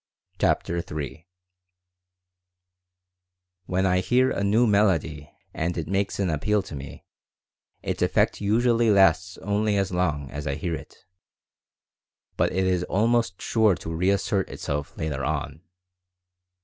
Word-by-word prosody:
CHAPTER 85 Hz, -, +1 dB
III 80 Hz, 0 st, -6 dB, 2.4 s
WHEN 95 Hz, +1 st, 0 dB
I 90 Hz, -1 st, +3 dB
hear 125 Hz, +6 st, +2 dB
a 100 Hz, -, -2 dB
new 110 Hz, +5 st, +3 dB
melody 85 Hz, -8 st, +1 dB, 0.2 s
and 85 Hz, +2 st, -2 dB
it 80 Hz, -2 st, -3 dB
makes 95 Hz, +1 st, -1 dB
an 100 Hz, -, +1 dB
appeal 100 Hz, +7 st, 0 dB
to 80 Hz, -, -8 dB
me 70 Hz, 0 st, -9 dB, 0.8 s
its -, -, -3 dB
effect -, -, +1 dB
usually 115 Hz, +2 st, +2 dB
lasts 95 Hz, -2 st, +3 dB
only 105 Hz, +1 st, +1 dB
as 95 Hz, -1 st, 0 dB
long 75 Hz, -6 st, -1 dB
as 75 Hz, +1 st, -5 dB
I 70 Hz, -, -1 dB
hear 85 Hz, +3 st, -3 dB
it, -, -, -9 dB, 1.3 s
but -, -, +1 dB
it 95 Hz, +1 st, 0 dB
is 90 Hz, -1 st, +1 dB
almost 115 Hz, -1 st, +1 dB
sure 110 Hz, -4 st, +3 dB
to 80 Hz, 0 st, -6 dB
reassert 95 Hz, +2 st, 0 dB
itself 70 Hz, 0 st, -5 dB
later 75 Hz, -4 st, -3 dB
on. 75 Hz, +1 st, -3 dB
90 Hz, 130 wpm, -25 LUFS, 80-100 Hz, 2.4 s, I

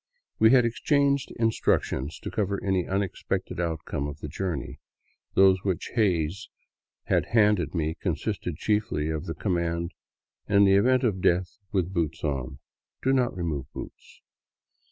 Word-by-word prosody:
We 110 Hz, -, +7 dB
had 125 Hz, -1 st, +6 dB
exchanged 140 Hz, +3 st, +1 dB
instructions 100 Hz, -, 0 dB
to -, -, -5 dB
cover 100 Hz, -3 st, -1 dB
any 95 Hz, -2 st, 0 dB
unexpected 95 Hz, -1 st, -2 dB
outcome 80 Hz, -4 st, -2 dB
of 75 Hz, 0 st, -6 dB
the 75 Hz, -, -6 dB
journey, 80 Hz, -2 st, -4 dB, 0.6 s
those 95 Hz, -1 st, +5 dB
which 95 Hz, -5 st, -2 dB
Hays 95 Hz, -4 st, 0 dB, 0.5 s
had -, -, +1 dB
handed 105 Hz, -8 st, +3 dB
me 80 Hz, -1 st, -1 dB
consisting -, -, -2 dB
chiefly 105 Hz, -8 st, 0 dB
of 80 Hz, -1 st, -4 dB
the 80 Hz, -, -4 dB
command, 85 Hz, -2 st, -1 dB, 0.3 s
" -, -, -39 dB
In 100 Hz, 0 st, +6 dB
the 95 Hz, -, +5 dB
event 125 Hz, +7 st, +4 dB
of 100 Hz, -6 st, 0 dB
death 90 Hz, 0 st, +1 dB, 0.2 s
with 95 Hz, -1 st, 0 dB
boots 80 Hz, -4 st, -2 dB
on, 65 Hz, -3 st, -2 dB, 0.5 s
do 135 Hz, -, +3 dB
not 125 Hz, -7 st, +1 dB
remove 75 Hz, -7 st, -3 dB
the -, -, -4 dB
boots -, -, -13 dB
95 Hz, 150 wpm, -27 LUFS, 80-105 Hz, 0.6 s, We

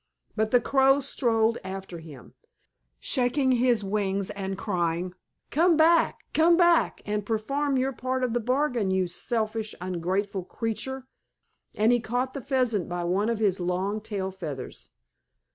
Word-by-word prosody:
But 220 Hz, 0 st, +1 dB
the 245 Hz, -, +5 dB
Crow 270 Hz, +2 st, +3 dB
strode 230 Hz, -4 st, +1 dB
after 190 Hz, -2 st, -7 dB
him, 150 Hz, -6 st, -13 dB, 0.7 s
shaking 260 Hz, -, +1 dB
his 245 Hz, -3 st, +2 dB
wings 195 Hz, -1 st, -1 dB
and 195 Hz, -2 st, -4 dB
crying, 175 Hz, -2 st, -1 dB, 0.4 s
"Come 335 Hz, +2 st, +4 dB
back, 325 Hz, +1 st, +4 dB
come 335 Hz, +2 st, +5 dB
back 345 Hz, -2 st, +3 dB
and 210 Hz, 0 st, -2 dB
perform 270 Hz, +7 st, -1 dB
your 260 Hz, +1 st, +1 dB
part 255 Hz, +2 st, -2 dB
of 245 Hz, -2 st, 0 dB
the 240 Hz, -, +1 dB
bargain, 250 Hz, -3 st, 0 dB
you 190 Hz, 0 st, +1 dB
selfish, 220 Hz, +3 st, -2 dB
ungrateful 185 Hz, +2 st, -2 dB
creature!" 245 Hz, +6 st, -4 dB, 0.7 s
And 215 Hz, +3 st, +3 dB
he 245 Hz, -, +3 dB
caught 245 Hz, +3 st, -2 dB
the 275 Hz, -, -5 dB
Pheasant 250 Hz, -, 0 dB
by 175 Hz, 0 st, -3 dB
one 190 Hz, +5 st, +1 dB
of 230 Hz, -, 0 dB
his 200 Hz, -4 st, +1 dB
long 185 Hz, +4 st, -1 dB
tail 200 Hz, -3 st, -4 dB
feathers. 155 Hz, -9 st, -7 dB
220 Hz, 145 wpm, -26 LUFS, 190-255 Hz, 0.7 s, the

